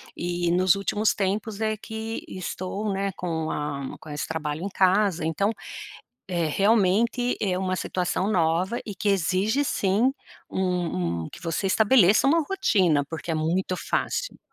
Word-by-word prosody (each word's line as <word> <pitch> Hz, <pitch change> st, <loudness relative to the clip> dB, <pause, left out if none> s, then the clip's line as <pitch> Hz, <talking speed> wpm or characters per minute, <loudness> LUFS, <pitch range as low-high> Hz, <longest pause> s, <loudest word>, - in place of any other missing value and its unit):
e 175 Hz, 0 st, -1 dB
nos 185 Hz, +1 st, +4 dB
últimos 205 Hz, +2 st, +1 dB
tempos 205 Hz, +2 st, -2 dB
é 215 Hz, 0 st, +1 dB
que 220 Hz, +1 st, -5 dB
estou, 185 Hz, +3 st, -4 dB
né, 195 Hz, 0 st, -1 dB
com 160 Hz, -3 st, -2 dB
a 140 Hz, -2 st, -4 dB
com 155 Hz, -, -12 dB
esse 145 Hz, 0 st, -4 dB
trabalho 155 Hz, 0 st, -3 dB
em 200 Hz, -, -2 dB
casa 190 Hz, -3 st, +2 dB
então, 195 Hz, +7 st, +1 dB, 0.8 s
é 175 Hz, -3 st, 0 dB
realmente 220 Hz, +6 st, +2 dB
é 185 Hz, -3 st, +1 dB
uma 185 Hz, 0 st, -1 dB
situação 185 Hz, +2 st, -1 dB
nova 180 Hz, +4 st, +1 dB
e 205 Hz, -, -6 dB
que 205 Hz, -, 0 dB
exige 195 Hz, -, +1 dB
sim 220 Hz, 0 st, +2 dB, 0.4 s
um 165 Hz, -, -1 dB
um -, -, -8 dB
que -, -, -11 dB
você 170 Hz, +3 st, -1 dB
estabeleça 215 Hz, +2 st, +5 dB
uma 330 Hz, +4 st, +4 dB
rotina, 180 Hz, -, +2 dB
porque 165 Hz, +1 st, -4 dB
é -, -, 0 dB
muito 175 Hz, +4 st, 0 dB
fácil. -, -, -2 dB
185 Hz, 155 wpm, -25 LUFS, 170-210 Hz, 0.8 s, estabeleça